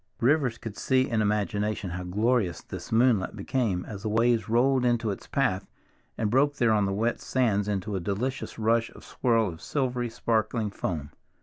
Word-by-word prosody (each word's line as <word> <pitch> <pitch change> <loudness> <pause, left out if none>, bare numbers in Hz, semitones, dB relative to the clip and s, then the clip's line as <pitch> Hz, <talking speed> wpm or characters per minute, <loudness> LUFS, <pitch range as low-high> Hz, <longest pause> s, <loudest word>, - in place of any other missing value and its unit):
Rivers 130 -2 +2
could 110 -3 -8
see 130 -1 +2
in 115 -2 0
imagination 105 -2 -1
how 90 +1 -4
glorious 105 +1 0
this - - -8
moonlight 115 -4 +3
became 100 -3 -1
as 100 -3 -7
the 110 - -2
waves 115 +1 +2
rolled 125 +3 +3
into 120 -3 +1
its 100 - -7
path 115 -9 0 0.5
and 105 -2 0
broke 145 +3 +3
there 120 -4 +2
on 105 -2 +2
the - - -1
wet 115 +5 0
sands 105 -6 +1
into 100 0 -2
a - - 0
delicious 110 +9 -3
rush 115 +1 +2
and - - -15
swirl 115 -3 +1
of 80 -2 -9
silvery 125 -4 -1
sparkling 110 -1 -1
foam. 80 -7 -4
110 Hz, 180 wpm, -27 LUFS, 100-125 Hz, 0.5 s, moonlight